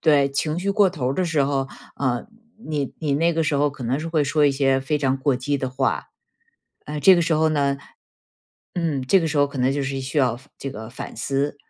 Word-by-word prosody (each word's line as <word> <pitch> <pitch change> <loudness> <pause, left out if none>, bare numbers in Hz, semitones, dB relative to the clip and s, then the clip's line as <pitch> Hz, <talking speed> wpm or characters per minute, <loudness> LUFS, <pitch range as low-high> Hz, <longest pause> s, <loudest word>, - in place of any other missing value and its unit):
对， 145 -3 +4
情 155 +3 -1
绪 195 +2 -1
过 200 -1 +4
头 130 -7 -2
儿 - - -1
的 185 - 0
时 155 -4 +2
候， 135 -1 -1 0.3
呃， 130 - -1 0.4
你 145 -4 -2
你 150 -3 0
那 165 +3 +2
个 165 - +1
时 155 -2 0
候 145 +1 +3
可 135 -3 -8
能 130 +5 0
是 165 - -4
会 155 -3 +1
说 145 +1 +3
一 - - +4
些 135 -1 +2
非 150 +3 0
常 135 -2 0
过 135 -1 +1
激 140 +3 -1
的 130 -1 -2
话。 130 +1 -1 0.8
呃， 150 0 -4
这 190 +5 +8
个 170 - +2
时 170 -1 0
候 160 +1 +3
呢 140 -2 +1 1.0
嗯， 160 -6 -1
这 185 +9 +4
个 165 - 0
时 150 -1 -1
候 145 - +5
可 140 - -10
能 130 +1 +2
就 140 0 -1
是 135 0 -3
需 135 +3 -2
要 125 -3 +2 0.2
这 135 - -5
个 110 +1 -8
反 - - -8
思。 140 +4 -1
145 Hz, 255 characters per minute, -23 LUFS, 135-155 Hz, 1.0 s, 这